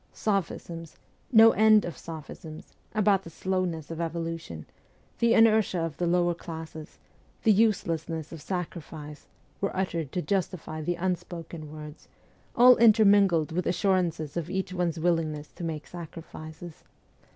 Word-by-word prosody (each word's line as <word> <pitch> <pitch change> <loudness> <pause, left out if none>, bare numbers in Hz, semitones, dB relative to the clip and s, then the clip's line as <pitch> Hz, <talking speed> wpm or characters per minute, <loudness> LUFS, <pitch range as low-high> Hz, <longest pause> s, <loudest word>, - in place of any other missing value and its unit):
Sophisms 170 -5 -3 0.3
no 225 -1 +8
end 215 0 +5
of 175 - -5
sophisms 160 0 -9 0.2
about 205 -2 +3
the 165 - -11
slowness 175 -3 -2
of 165 +1 -4
evolution, 165 - -4 0.5
the 235 0 +4
inertia 220 -4 +4
of 165 -3 -3
the 175 - 0
lower 175 0 +2
classes, 160 -2 -9 0.5
the 220 - +5
uselessness 165 -7 0
of 165 -3 -8
sacrifice, 160 -4 -6 0.3
were 195 -1 -2
uttered 170 -6 -2
to - - -2
justify 180 -5 -2
the 175 +3 -1
unspoken 170 -3 -4
words, 150 0 -10 0.5
all 250 +1 +8
intermingled 200 -7 +5
with 180 +2 -1
assurances 175 -5 0
of 170 -1 -3
each 190 0 -3
one's 175 -3 -1
willingness 160 -3 -1
to - - -9
make 160 -2 -4
sacrifices. 165 -1 -10
170 Hz, 130 wpm, -27 LUFS, 160-190 Hz, 0.5 s, no